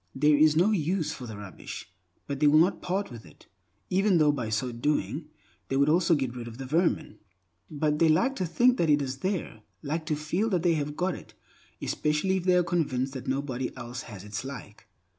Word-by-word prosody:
There 150 +2 +4
is 155 +1 +5
no 180 +7 +4
use 175 -2 0
for 125 - -8
the 110 -2 -7
rubbish, 100 -2 -8 0.4
but 140 -1 -4
they 150 - +4
will 150 +1 +6
not 170 +5 +3
part 190 0 -2
with 115 -2 -9
it, - - -18 0.5
even 195 0 +3
though 150 -2 +5
by 125 -6 -3
so 115 +3 -1
doing, 150 +5 -1 0.4
they 135 - 0
would 140 +2 +4
also 165 +1 +4
get 130 -4 -2
rid 120 -1 -6
of 115 0 -9
the 135 - -6
vermin. 160 -6 0 0.5
But 150 0 0
they 165 - +5
like 240 +13 +3
to 185 - -1
think 245 +8 +3
that 165 - +2
it 145 0 +5
is 130 -1 -4
there; 180 - -3 0.2
like 155 +2 -3
to 155 - +1
feel 165 +9 -1
that 180 -5 0
they 175 -2 +4
have 150 -1 -3
got 180 +1 0
it, - - -11 0.5
especially 155 +6 0
if 180 - -4
they 180 -1 +4
are 180 - +4
convinced 140 -7 -1
that 130 - -7
nobody 130 -1 -2
else 120 0 -6
has 100 -4 -9
its 105 +1 -5
like. 115 -6 -9
150 Hz, 215 wpm, -28 LUFS, 130-175 Hz, 0.5 s, will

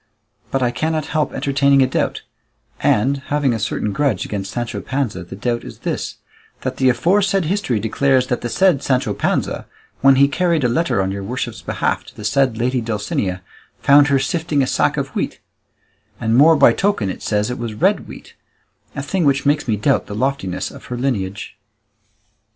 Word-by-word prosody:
But 135 -1 0
I 120 - +2
cannot 155 +4 -1
help 155 -2 +1
entertaining 140 0 +3
a - - +4
doubt, 130 - -2 0.6
and 130 +7 +2
having 145 -3 +1
a 115 - -2
certain 105 0 -2
grudge 130 -6 0
against 100 -2 -4
Sancho 120 -1 -4
Panza; 125 -10 -2
the 90 - -9
doubt 120 +3 -2
is - - -10
this, - - -3 0.5
that 130 0 -3
the 130 -1 +3
aforesaid 190 - +2
history 160 - 0
declares 130 +4 +2
that 125 -1 -2
the 120 - -3
said 180 -2 +3
Sancho 130 -3 0
Panza, - - -1 0.3
when 135 0 +6
he 140 +1 +5
carried 170 0 +1
a - - +4
letter 120 - +1
on 95 - -2
your 100 0 -4
worship's 120 0 -4
behalf - - -1
to - - -15
the 105 - -8
said 130 +1 +2
lady 125 +2 0
Dulcinea, 105 -4 -2 0.4
found 145 +1 +6
her 140 -1 +3
sifting 155 +1 0
a - - +1
sack - - +1
of - - -2
wheat; - - -3 0.8
and 115 -1 +1
more 155 +5 +7
by - - +6
token 195 - 0
it - - -9
says 105 +2 0
it 125 - -5
was 115 -2 -4
red - - +1
wheat; - - -12 0.6
a 140 - -3
thing 180 +5 -1
which 140 -1 +2
makes 145 0 +1
me 110 - +2
doubt 105 - +1
the 100 - -6
loftiness 130 -6 -2
of - - -13
her 125 - -5
lineage." 105 -6 -3
130 Hz, 190 wpm, -19 LUFS, 110-140 Hz, 0.8 s, more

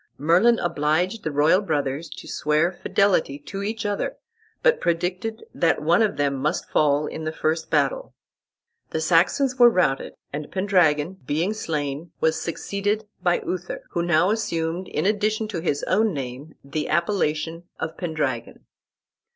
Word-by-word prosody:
Merlin 180 - +4
obliged 175 +5 0
the - - -1
royal 150 +6 +4
brothers 150 -3 -2
to - - -10
swear 155 +3 +1
fidelity 185 -5 +1
to 195 +7 -7
each 220 +2 -3
other, 205 -1 -2 0.5
but - - +4
predicted 180 +6 -1
that 165 - +2
one 170 +6 +4
of 215 -2 +1
them 140 -1 +1
must 145 +3 -1
fall 145 0 +3
in 160 - -5
the 155 - -2
first 160 +1 -1
battle. - - 0 0.7
The 160 - -2
Saxons 180 - +2
were 240 -1 +9
routed, 180 -11 +1 0.2
and 145 0 -5
Pendragon, 185 -3 +2
being 165 +8 0
slain, 150 -5 -3
was 160 0 +1
succeeded 205 +5 -2
by 175 -1 +1
Uther, 180 0 -4
who 170 - 0
now 175 +2 +3
assumed 175 -5 -2
in 155 - -2
addition 215 +1 +1
to 190 -6 -3
his 155 -4 -1
own 210 -1 +2
name 135 +3 -6
the 140 +2 -3
appellation 165 -1 0
of 160 0 -4
Pendragon. 150 -9 -3
170 Hz, 150 wpm, -24 LUFS, 150-200 Hz, 0.7 s, were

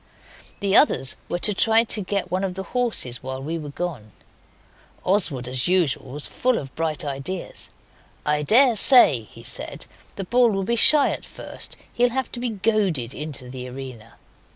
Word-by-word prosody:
The 200 0 +1
others 135 - +4
were 175 - -2
to 210 +4 -1
try 225 +3 +3
to 220 -2 -1
get 195 -1 -3
one 185 +1 -1
of 185 -2 -3
the 190 - -5
horses 230 - 0
while 130 0 -6
we 160 +5 -5
were 150 -2 -8
gone. 140 - -6 0.9
Oswald 170 -10 +1
as 125 0 -1
usual 165 -8 0
was 145 0 -4
full 255 -1 -1
of 135 -2 -7
bright 155 -2 -2
ideas. 145 +6 -5 0.6
'I 150 0 0
daresay,' 235 - +6
he - - -15
said, - - -3 0.3
'the 195 - -4
bull 240 +5 +3
will 195 -2 -2
be 235 +5 -1
shy 285 +5 +6
at - - -5
first, - - -6
and - - -26
he'll 245 +1 +2
have 260 +2 -4
to 240 - -6
be 245 0 -3
goaded 195 - -1
into 150 -4 -5
the 125 0 -8
arena. 125 -4 -10
180 Hz, 175 wpm, -22 LUFS, 135-220 Hz, 0.9 s, daresay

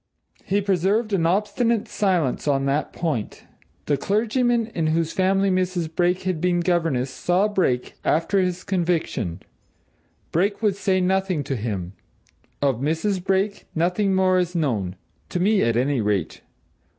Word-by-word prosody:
He 200 +1 0
preserved 200 +3 +1
an 165 -4 +2
obstinate 215 +4 +1
silence 175 -10 0
on 135 -1 +2
that 140 +2 0
point. 150 -11 -3 0.4
The 145 - +1
clergyman 230 - +1
in 160 -2 0
whose 160 +1 0
family 195 +1 +2
Mrs. 180 -3 -1
Brake 180 +1 +1
had 185 -4 -2
been 180 -1 +2
governess 165 -7 0
saw 180 +9 +1
Brake, 175 -12 0
after 165 +5 +2
his 180 -1 -1
conviction 170 - -1 0.9
Brake 200 +5 +1
would 205 -3 +2
say 190 -1 +1
nothing 185 -3 +1
to 135 - -3
him. 100 -6 -4 0.7
Of 135 -4 +2
Mrs. 170 +6 -1
Brake, 195 +2 0
nothing 180 +4 +1
more 185 -1 +3
is 180 0 -2
known 110 - -1 0.3
to 180 - -2
me 205 +3 +3
at 115 0 +2
any 130 0 +1
rate. 105 -5 -1
180 Hz, 145 wpm, -23 LUFS, 150-195 Hz, 0.9 s, more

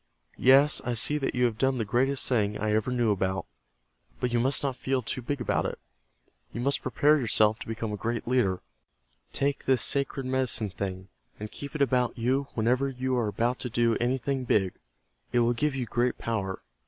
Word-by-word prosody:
Yes, 135 +3 +5
I 125 -1 -2
see 145 +6 0
that 135 - -2
you 125 0 +3
have 115 -2 -1
done 135 -1 +2
the 115 - -1
greatest 130 +6 +1
thing 105 -4 +1
I 105 0 -1
ever 110 +3 +1
knew 120 -3 +2
about, 95 -1 -1 0.7
But 125 -1 -1
you 120 - +3
must 135 +5 +2
not 135 -2 -1
feel 130 0 -1
too 130 - -2
big 140 +4 -3
about 120 - 0
it. - - -5 0.7
You - - -6
must 140 +3 +1
prepare 145 +4 +3
yourself 110 -3 +3
to - - -8
become 110 -1 -4
a - - -3
great 115 +3 -3
leader. 100 -8 +1 0.7
Take 140 0 -1
this 130 -3 +3
sacred 140 -1 -1
Medicine 130 -5 -1
Thing, 95 -1 -5 0.3
and 105 0 -6
keep 140 0 -8
it 145 - +3
about 125 -2 +1
you 130 +4 0
whenever 125 +5 +1
you 130 0 -2
are 120 -3 +1
about 120 +4 -1
to 125 - -4
do 115 0 +2
anything 130 +2 -1
big. 95 -6 +1 0.6
It 120 - +3
will 120 +1 +3
give 145 +3 0
you 130 -2 -2
great 120 +2 0
power. 100 -5 -3
125 Hz, 200 wpm, -28 LUFS, 110-130 Hz, 0.7 s, Yes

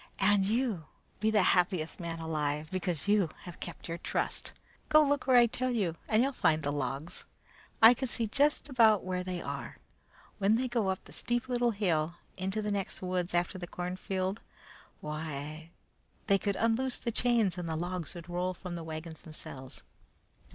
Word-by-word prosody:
"And 195 0 +4
you 220 -7 0 0.3
be 215 +1 +2
the 210 -3 +4
happiest 180 -3 +2
man 170 -1 -4
alive, 155 -2 -2
because 180 -3 -2
you 205 -5 +4
have 175 - -9
kept - - -7
your 170 0 -4
trust. - - -2 0.4
Go 305 0 +7
look 285 -1 +1
where 255 -1 +6
I 240 - +8
tell 255 +2 -1
you 200 -9 0
and 220 +2 +4
you'll 275 - +1
find 160 - +2
the 145 - 0
logs. 140 +3 -3 0.6
I 225 +2 +11
can 265 +2 -3
see 235 -1 0
just 285 +9 +2
about 225 -7 +5
where 180 0 -2
they 180 -1 -4
are. - - -5 0.6
When 200 +2 +4
they 255 +3 0
go 235 -5 0
up 190 0 -2
that - - -13
steep 240 +1 -1
little 245 -1 +2
hill, 170 -7 0 0.2
into 190 +3 -2
the 210 - -1
next 200 -2 -2
woods 180 -1 -1
after 175 +2 0
the 175 - -5
cornfield, 185 +3 -3 0.6
why, 155 +1 -5 0.6
they 195 0 +4
could 200 -1 -1
unloose 235 +4 +1
the 235 - -2
chains 230 -6 +2
and 170 -2 -4
the 160 - -1
logs 175 0 -3
would 170 -1 -8
roll 180 +1 -1
from 180 0 -7
the 170 -1 -5
wagons 160 0 -6
themselves. 135 -4 -9
185 Hz, 180 wpm, -31 LUFS, 165-225 Hz, 0.6 s, I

